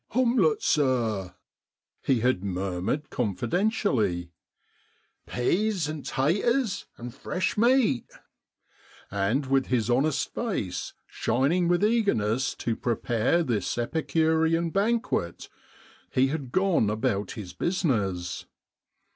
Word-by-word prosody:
" - - -33
Homlette, 260 - +3
sir," 115 -10 +1 0.7
he 130 -5 +1
had 125 -6 +1
murmured 95 +8 -2
con 105 -6 -1
fidentially, 115 - 0 0.5
" - - -40
peas 180 - +1
and 155 -1 -5
taters, 200 - 0
and 120 0 -7
fresh 180 +7 -2
meat! 235 - +3 0.6
" - - -29 0.2
and 100 +8 0
with 135 0 +1
his 120 -2 +1
honest 140 +4 +1
face 180 - -3
shining 145 +9 +1
with 175 +3 +3
eagerness 130 - +1
to 115 - -2
prepare 120 +7 +1
this 115 - -1
Epicurean 160 +5 +1
banquet 205 - -1 0.6
he 130 +1 +2
had 140 -4 -4
gone 185 - +2
about 105 -2 -1
his 100 -6 -8
business. 105 - -1
135 Hz, 110 wpm, -27 LUFS, 110-180 Hz, 0.7 s, Homlette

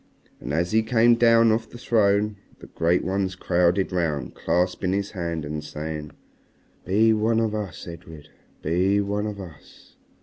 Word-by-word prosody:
And - - -6
as 85 +4 0
he 110 +1 +4
came 115 +1 +4
down 115 -1 +5
off 115 +1 -1
the - - -11
throne 105 -3 +1 0.2
the - - -13
great 85 +2 0
ones 95 -1 -1
crowded 90 +1 +1
round 80 -6 -1
him, - - -17
clasping 90 +2 -1
his 100 0 -2
hand 85 -5 -4
and 75 +1 -5
saying 75 0 -6 0.8
"Be 110 +5 +3
one 110 +1 +1
of 110 -2 0
us, 105 -4 -5
Edred. 80 -3 -11 0.3
Be 90 +5 +2
one 100 +1 -1
of 105 -1 -6
us." 85 -6 -13
95 Hz, 165 wpm, -24 LUFS, 85-110 Hz, 0.8 s, down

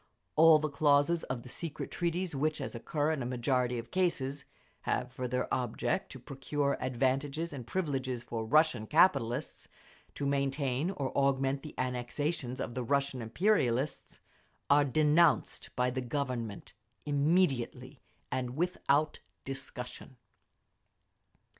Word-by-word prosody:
All 160 0 +8
the 155 0 -1
clauses 145 +3 +3
of 125 -2 -4
the - - -11
secret 160 +3 -4
treaties 175 0 -1
which, 155 +2 0
as 135 - -4
occur 145 +6 -1
in 155 -4 -1
a - - -3
majority 125 0 0
of 115 - -7
cases, 145 -7 0 0.4
have 125 - 0
for 130 0 -4
their 125 +1 -1
object 120 -1 -1
to 130 - -8
procure 140 +2 -2
advantages 135 +5 0
and 125 -4 -7
privileges 130 -7 -2
for 115 -2 -4
Russian 150 -3 +3
capitalists, 150 -8 +2 0.5
to 140 - -3
maintain 140 +1 0
or 140 -9 -3
augment 135 0 +2
the 150 - -10
annexations 125 +2 -2
of 120 - -3
the 125 0 -3
Russian 140 0 0
imperialists, 130 - 0 0.5
are 145 0 +6
denounced 155 +4 +3
by 125 0 +1
the 130 +1 -2
Government 125 -4 -4 0.3
immediately 145 -2 +1 0.3
and 125 0 -2
without 155 -4 +1 0.3
discussion. 135 -1 -6
140 Hz, 130 wpm, -31 LUFS, 125-155 Hz, 0.5 s, All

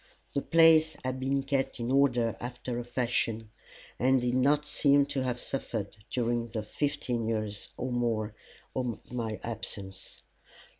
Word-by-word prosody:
The 140 - +1
place 160 -1 +5
had 130 0 -2
been 135 +1 0
kept 135 -2 -1
in 120 +2 -1
order 125 -5 +3
after 120 0 -4
a - - -3
fashion, 115 -2 -1 0.5
and 130 +2 +4
did 120 0 0
not 145 +4 +3
seem 145 -1 +4
to 140 -1 -2
have 125 -1 -1
suffered 110 -7 -3
during 120 -1 0
the 110 -1 -4
fifteen 120 -1 -1
years 110 -2 -2
or 125 +1 -3
more 115 -3 0 0.4
of 125 -3 -3
my 115 -3 -3
absence. 100 -4 -5
125 Hz, 145 wpm, -30 LUFS, 115-135 Hz, 0.5 s, place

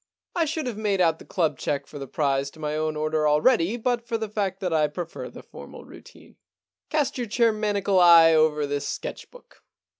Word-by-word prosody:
I 335 - +2
should 315 -1 -3
have 240 -4 -4
made 205 -3 0
out 165 -3 +2
the - - -13
club 160 -8 -1
cheque 145 -1 -2
for 145 - -10
the 135 - -7
prize 140 -1 -1
to 160 - -18
my 150 -1 -3
own 155 0 -2
order 155 0 0
already 170 +6 +2
but 240 0 -2
for 230 -1 -1
the 220 -1 -5
fact 195 -3 -2
that 180 -3 -2
I 155 -1 +3
prefer 165 +3 -7
the - - -12
formal - - -12
routine. - - -16 0.5
Cast 295 -4 -1
your 240 - -3
chair 230 +2 +2
maniacal 205 -3 0
eye 170 -2 +7
over 155 -1 +2
this 145 0 -3
sketch - - -6
book. - - -19
175 Hz, 210 wpm, -24 LUFS, 155-225 Hz, 0.5 s, eye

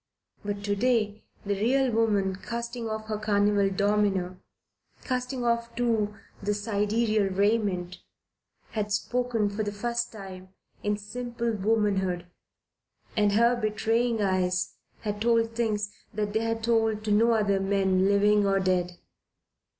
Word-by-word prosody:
But 205 0 -4
to 205 0 0
day 215 -2 +1 0.2
the 200 - 0
real 250 +6 +2
woman, 205 -4 +1
casting 235 +3 -5
off 220 0 -4
her 215 -1 -3
carnival 205 -1 +2
domino, 195 -2 +1 0.7
casting 250 -1 -2
off 235 0 0
too 225 -4 0 0.3
the 205 +1 0
sidereal 210 0 +1
raiment, 195 -3 0 0.7
had 210 -1 -2
spoken, 235 +1 0
for 205 +2 -3
the 205 -1 -2
first 235 +3 -2
time, 190 -3 -9 0.3
in 210 0 0
simple 235 +3 -3
womanhood, 195 -4 0 0.9
and 210 -2 +3
her 235 +3 +4
betraying 225 0 0
eyes 185 -1 0 0.3
had 210 -1 -4
told 230 0 +3
things 210 -3 -1 0.2
that 210 -1 -2
they 220 - +2
had 225 0 -2
told 225 -2 +1
to 215 - -1
no 230 +3 +4
other 205 -3 +2
man 195 -1 +2
living 205 +1 +4
or 195 0 +3
dead. 180 -1 0
210 Hz, 135 wpm, -27 LUFS, 200-230 Hz, 0.9 s, her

